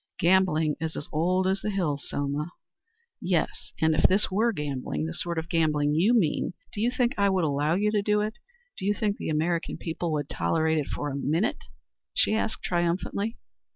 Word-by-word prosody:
"Gambling 170 -4 +3
is 160 -1 -3
as 150 - -5
old 180 +4 +1
as 190 +1 +1
the - - -2
hills, 165 -8 -2
Selma." 145 +4 -2 0.7
"Yes. 175 -3 -1
And 160 0 +3
if 155 - +2
this 195 +2 +4
were 220 +5 +2
gambling 135 - -3
the 80 - -4
sort 170 -1 -3
of 160 0 -2
gambling 155 -4 +2
you 195 +10 +4
mean, 180 -5 +1 0.2
do 205 - -3
you 235 - +3
think 245 -1 +1
I 200 0 +4
would 190 -2 +1
allow 150 +2 +1
you 210 +3 +2
to 210 -1 +2
do 210 +1 +2
it? 215 +1 -2 0.5
Do - - -4
you 205 - +2
think 210 -2 -1
the - - -4
American 165 +2 0
people 165 0 -3
would 145 -2 -1
tolerate 160 0 +1
it 145 - -3
for 145 0 -3
a - - -4
minute?" 160 - 0 0.5
she - - +3
asked 220 0 -1
triumphantly. 180 +5 -1
170 Hz, 195 wpm, -27 LUFS, 150-200 Hz, 0.7 s, this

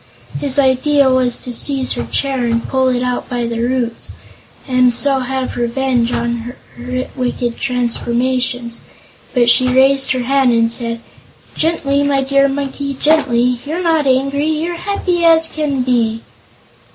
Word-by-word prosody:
His 280 -1 0
idea 275 +1 +3
was 255 -2 +1
to 250 - -6
seize 270 +2 +1
her - - -3
hair 270 -3 -1
and 230 0 -1
pull 260 -1 +1
it 250 -1 0
out 250 0 -3
by 245 -1 -2
the 230 0 -3
roots, 240 -1 -2 0.6
and 255 -1 +3
so 270 +3 +1
have 260 0 -3
revenge 240 0 0
for 235 0 -3 0.2
her 250 +1 -4
wicked 245 -2 -3
transformations. 245 -1 -1 0.5
But 240 -1 +3
she 255 - +3
raised 270 +2 +3
her 255 -1 -2
hand 265 -1 +2
and 230 0 +2
said: 230 -1 -4 0.5
"Gently, 295 -4 0
my 280 -1 +1
dear 275 +1 +3
Monkey 275 0 -4
gently! 250 -5 +2
You're 320 +5 -4
not 320 -4 +1
angry; 275 +3 +1
you're 320 +3 -2
happy 360 -2 -1
as 325 -1 +5
can 290 -5 -2
be!" 230 -3 0
260 Hz, 150 wpm, -16 LUFS, 245-280 Hz, 0.6 s, as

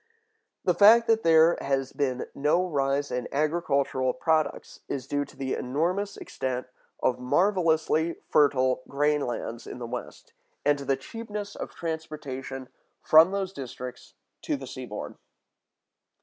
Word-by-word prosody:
The 180 - +3
fact 215 +6 +7
that 225 -1 +3
there 165 -1 +5
has 135 -1 -1
been 130 -3 -1
no 150 +6 +2
rise 140 -2 0
in 125 -1 -2
agricultural 140 -4 +1
products 160 -2 -1
is 135 -3 -4
due 145 +1 -1
to - - -18
the 135 -1 -2
enormous 175 +10 -1
extent 130 -1 -4 0.4
of 125 - +2
marvelously 165 +1 +2
fertile 130 -3 +3
grain 150 +1 +1
lands 120 -1 -5
in - - -7
the 120 - -5
West, 120 +1 -7 0.3
and 145 0 +3
to 140 - -7
the 135 0 +1
cheapness 210 +5 -7
of - - -7
transportation 145 -5 -5 0.4
from 160 +3 +7
those 195 -1 -2
districts 125 -3 -8 0.3
to - - -1
the - - -8
seaboard. - - -7
145 Hz, 135 wpm, -27 LUFS, 130-170 Hz, 0.4 s, fact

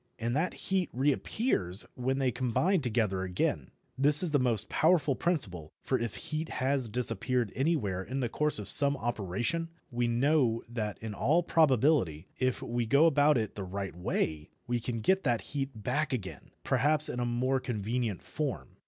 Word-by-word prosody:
And 120 +2 -2
that 165 +5 0
heat 190 -3 -1
reappears 130 - 0
when 130 +2 -1
they 135 -2 +1
combine 155 - +1
together 110 -6 0
again. 90 -1 -1 0.3
This 145 +4 +6
is 165 -4 -1
a 145 - +4
most 120 -5 +1
useful 160 -4 +4
principle, 95 - -2
for 130 - 0
if 115 -1 -3
heat 155 +1 -4
has 130 -2 -1
disappeared 120 0 0
anywhere 130 - 0
in 130 +8 -4
the 125 - 0
course 150 +6 0
of 105 -2 -4
some 140 0 +5
operation, 120 - -2 0.2
we 120 0 0
know 120 -1 +2
that 110 -3 -4
in 110 -1 -4
all 160 - +2
probability, 135 - +2
if 130 -1 0
we 120 -1 -2
go 140 +7 +5
about 150 -2 +4
it 110 -2 -2
the 100 - -6
right 95 -1 -5
way, 80 -3 -2 0.2
we 120 -1 -1
can 115 -1 -4
get 190 - +2
that 120 -4 +1
heat 135 -2 -1
back 145 +5 0
again, 100 -7 -5
perhaps 150 +4 +2
in 125 - -4
a - - 0
more 125 +3 0
convenient 115 -3 -3
form. 130 +9 -5
125 Hz, 170 wpm, -30 LUFS, 110-145 Hz, 0.3 s, This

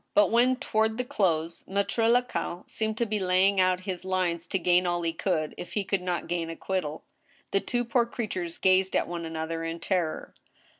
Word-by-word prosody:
But 205 -1 +5
when, 245 +3 +4
toward 220 -4 0
the 250 - 0
close, 170 -7 0
Maitre 200 +4 +1
Lacaille 240 -7 0
seemed 220 0 -2
to 235 - +1
be 215 -1 -1
laying 190 +1 +3
out 185 0 +2
his 185 -1 -5
lines 180 -2 -1
to - - 0
gain 180 0 +3
all 175 0 0
he 165 -1 0
could, 160 -3 -1
if - - -7
he 205 - 0
could 195 -1 -1
not 180 -1 -2
gain 170 -1 -2
acquittal, 165 -2 -3 0.5
the 195 - +3
two 240 +4 -1
poor 235 0 +2
creatures 185 -8 -4
gazed 190 0 +3
at - - +2
one 170 -1 -4
another 165 0 -3
in 165 +1 -4
terror. 170 -2 -1
185 Hz, 195 wpm, -28 LUFS, 170-215 Hz, 0.5 s, But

